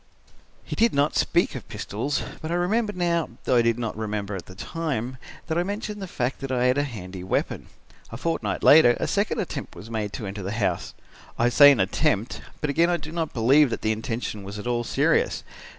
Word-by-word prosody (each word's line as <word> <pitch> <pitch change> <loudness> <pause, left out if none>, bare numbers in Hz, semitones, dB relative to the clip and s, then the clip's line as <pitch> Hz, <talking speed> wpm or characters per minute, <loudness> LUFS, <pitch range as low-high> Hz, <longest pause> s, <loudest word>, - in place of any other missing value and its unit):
"He - - -5
did 230 -5 +3
not 145 +2 +2
speak - - +2
of - - -7
pistols, 135 +8 -3 0.2
but 155 - -5
I 170 - 0
remember 205 +5 +1
now, 175 -3 0
though 125 - +2
I - - +6
did 115 0 +2
not 115 -2 -3
remember 105 -2 -3
at 90 - -7
the 95 - -11
time, 130 - -3 0.3
that 160 +1 -1
I - - +3
mentioned 205 +2 -4
the 190 - -4
fact 125 -5 -2
that 135 -1 -5
I 125 -1 +1
had 125 +3 +3
a - - +2
handy 95 -5 -8
weapon. 95 - -2 0.4
A - - -6
fortnight 165 -1 -2
later 140 -5 +7
a - - 0
second 200 +3 0
attempt 160 - -4
was 110 +2 -10
made 105 -2 -2
to 110 - -5
enter 100 +1 -5
the 100 +2 -4
house. 110 -2 -1 0.4
I 120 - +3
say 145 +3 +8
an 135 - +2
attempt, 105 +3 0 0.2
but 150 - 0
again 165 +4 +3
I 175 - +2
do 150 -1 -8
not 165 -2 -2
believe 130 +5 +5
that - - -4
the 110 - +2
intention 110 -1 -3
was 100 +2 -7
at 105 - -7
all 120 -1 0
serious. - - +1
125 Hz, 220 wpm, -25 LUFS, 110-165 Hz, 0.4 s, say